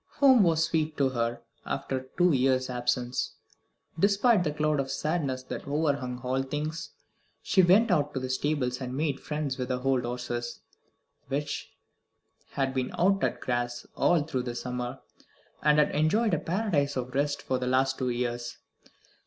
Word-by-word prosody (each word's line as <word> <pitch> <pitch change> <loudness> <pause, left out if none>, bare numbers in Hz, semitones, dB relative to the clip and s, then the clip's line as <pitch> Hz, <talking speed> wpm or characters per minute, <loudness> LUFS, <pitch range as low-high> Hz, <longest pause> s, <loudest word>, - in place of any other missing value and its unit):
Home 265 -4 +7
was 165 -3 +3
sweet 160 -1 0
to 135 -2 +3
her 120 -2 -2 0.2
after 130 - -2
her 130 - -13
two 180 0 +5
years' 130 -1 +2
absence, 125 0 -1 0.7
despite 200 +2 +4
the 150 - 0
cloud 150 0 0
of 135 -1 -1
sadness 145 -5 -1
that 130 - -7
overhung 140 -4 -1
all 130 +1 0
things. 150 +4 -4 0.5
She 190 - +4
went 195 +5 +5
out 150 -4 +2
to - - 0
the 130 0 -3
stables 130 -2 -1
and 130 0 -4
made 145 -2 0
friends 150 -3 -3
with 125 - -2
the 125 -1 -1
old 130 -1 +1
horses, 120 0 -4 0.7
which 145 +2 -4 0.8
had 135 -1 0
been 130 -1 -1
out 195 +2 +3
at - - 0
grass 120 -1 -2
all 170 -4 +3
through 145 -4 -2
the 120 -1 -5
summer, 125 0 -4 0.6
and 150 0 +4
had 150 - +4
enjoyed 180 +8 +2
a 165 - +2
paradise 165 -7 0
of 125 0 -4
rest 145 +1 0
for 130 -3 -1
the 125 - -2
last 130 +1 +2
two 130 -1 0
years. 120 0 -3
135 Hz, 170 wpm, -28 LUFS, 125-155 Hz, 0.8 s, Home